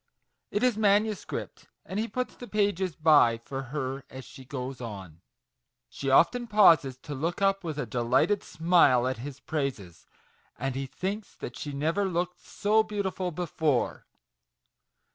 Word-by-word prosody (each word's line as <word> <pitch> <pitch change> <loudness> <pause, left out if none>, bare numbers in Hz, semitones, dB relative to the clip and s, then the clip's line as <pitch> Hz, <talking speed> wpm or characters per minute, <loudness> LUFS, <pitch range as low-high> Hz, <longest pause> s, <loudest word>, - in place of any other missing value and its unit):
It 205 - -1
is 245 -4 +2
manuscript, 210 0 0 0.2
and 190 - -4
he 225 - -1
puts 250 +4 -3
the 245 - -10
pages 200 -6 0
by 145 -7 +5
for 135 +4 -6
her 135 -1 -3
as 130 0 -9
she 135 - -12
goes 130 0 -6
on. 95 -8 -8 0.7
She 135 - -4
often 240 - +4
pauses, 165 - +5
to 150 - -6
look 160 +5 -2
up 195 0 +2
with 160 -3 -4
a 150 - -2
delighted 125 - +1
smile 160 -7 +3
at 130 -3 -2
his 135 +2 -7
praises, 135 - -4 0.5
and 135 +2 -2
he 135 +1 -4
thinks 195 +8 -5
that 120 - -7
she 145 - -5
never 160 +8 0
looked 180 -1 -2
so 215 +2 +1
beautiful 200 -4 -2
before 160 -5 -1
155 Hz, 150 wpm, -28 LUFS, 130-200 Hz, 0.7 s, by